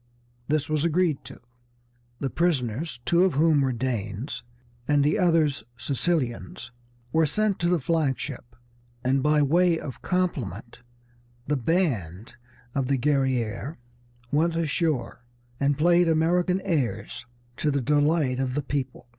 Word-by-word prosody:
This 150 -1 0
was 155 -1 0
agreed 170 -3 +1
to. - - -11 0.8
The 135 - -2
prisoners, 140 -4 -1
two 170 +7 +4
of 185 -6 +2
whom 155 0 +4
were 135 -1 +1
Danes, 115 -1 -3 0.5
and 145 -1 +3
the 150 +8 +2
others 165 -6 +2
Sicilians, 140 0 -2 0.4
were 160 -1 +4
sent 210 +6 0
to 170 - +1
the 175 -1 +2
flag 150 -2 0
ship, 120 -4 -7 0.5
and 135 +1 +2
by 150 +1 +3
way 170 +4 +3
of 130 - -8
compliment 155 - -2 0.7
the 150 - 0
band 120 - -1 0.4
of 135 -2 0
the 140 0 +2
Guerrière 130 -1 0 0.6
went 165 +3 +2
ashore 155 -7 -1 0.4
and 140 0 +1
played 175 +2 +4
American 175 +3 +2
airs 130 -6 -2 0.3
to 155 - 0
the 140 -1 +1
delight 145 0 +2
of 130 -1 -1
the 145 - -1
people. 135 -3 -4
145 Hz, 135 wpm, -26 LUFS, 130-165 Hz, 0.8 s, two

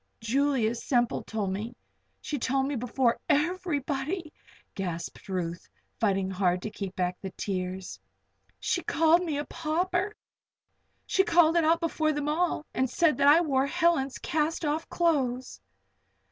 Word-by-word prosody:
"Julia 245 0 +1
Semple 240 0 0
told 210 -4 -2
me 220 +5 -5 0.5
she 290 - -3
told 265 +2 +1
me 285 +1 -2
before 245 0 +1
everybody!" 305 -1 -1 0.4
gasped 180 +2 -5
Ruth, 170 -2 -3 0.3
fighting 195 -4 +1
hard 180 -1 +1
to 215 - -4
keep 195 -2 -6
back 180 0 -2
the 190 - -4
tears. 185 - -4 0.6
"She 345 - 0
called 330 +2 +3
me 315 -5 -2
a 290 - -2
pauper! 355 +6 -1 0.9
She 385 - +3
called 340 -5 +4
it 335 -2 +4
out 330 +2 +3
before 315 -2 +1
them 295 0 -2
all, 315 0 0
and 260 -1 +1
said 320 +2 +3
that 280 0 +3
I 305 +4 +7
wore 275 -4 +1
Helen's 280 -4 +1
cast 320 0 -1
off 300 +2 -1
clothes!" 260 - 0
280 Hz, 145 wpm, -28 LUFS, 215-325 Hz, 0.9 s, I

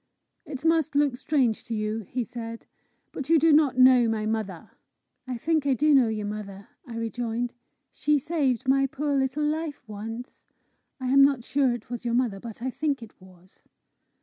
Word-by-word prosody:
"It 275 +1 -7
must 320 -2 +2
look 285 -3 +3
strange 250 -4 0
to 230 - -4
you," 215 +1 -2
he 250 0 -1
said; 230 -1 -8 0.5
"but 280 0 -6
you 330 - +6
do 320 +1 +4
not 290 -4 +4
know 255 -2 +6
my 220 -1 -1
mother!" 215 -6 -3 0.6
"I 250 -2 -3
think 310 +2 0
I 270 - +3
do 300 +4 +3
know 260 -4 +5
your 215 -2 -3
mother," 200 -1 -7 0.2
I 235 - -7
rejoined. 235 +1 -3 0.4
"She 300 0 +1
saved 275 -5 -1
my 270 +1 +3
poor 285 +2 -2
little 270 +2 0
life 305 -2 -2
once. 225 +4 -8 0.5
I 255 -1 -3
am 275 +1 +6
not 275 -4 +3
sure 270 0 +1
it 240 0 -11
was 245 - -5
your 235 -1 0
mother, 240 -6 0
but 230 +1 -9
I 260 - -1
think 280 -2 -2
it 220 -4 -15
was." 185 0 -19
250 Hz, 185 wpm, -26 LUFS, 225-285 Hz, 0.6 s, you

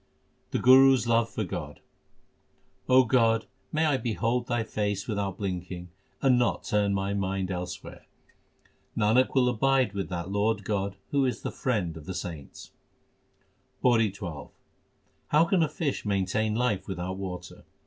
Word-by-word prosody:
The - - -1
Guru 135 +1 +7
s 125 - -2
love 115 -1 +2
for - - -3
God: - - -6 1.1
O 130 0 +7
God, 115 -2 +3 0.3
may 155 +1 +1
I 145 -3 +2
behold 120 0 -1
Thy 120 -2 0
face 105 -2 -2
without 100 -4 -2
blinking 90 -2 -5 0.3
and 130 -2 +5
not 120 - 0
turn 105 -1 +1
my 100 +1 -1
mind 95 -1 -2
elsewhere! 90 -1 -6 0.9
Nanak 110 +6 +3
will 130 -2 +4
abide 125 -1 +2
with 100 -1 -3
that 90 +1 -4
Lord 105 +1 0
God 100 -1 -2 0.2
who 140 -1 +2
is 130 -2 -1
the - - -3
Friend 100 -11 -1
of 80 -2 -10
the 95 - -4
saints. 85 -6 -7 1.1
PAURI 115 -4 +4
XII 85 -8 -7 0.8
How 155 +3 +4
can 180 0 +2
a 160 - +2
fish 150 -2 -2
maintain 105 +2 0
life 110 -6 0
without 95 -1 -4
water 90 -2 -7
105 Hz, 150 wpm, -27 LUFS, 95-125 Hz, 1.1 s, Guru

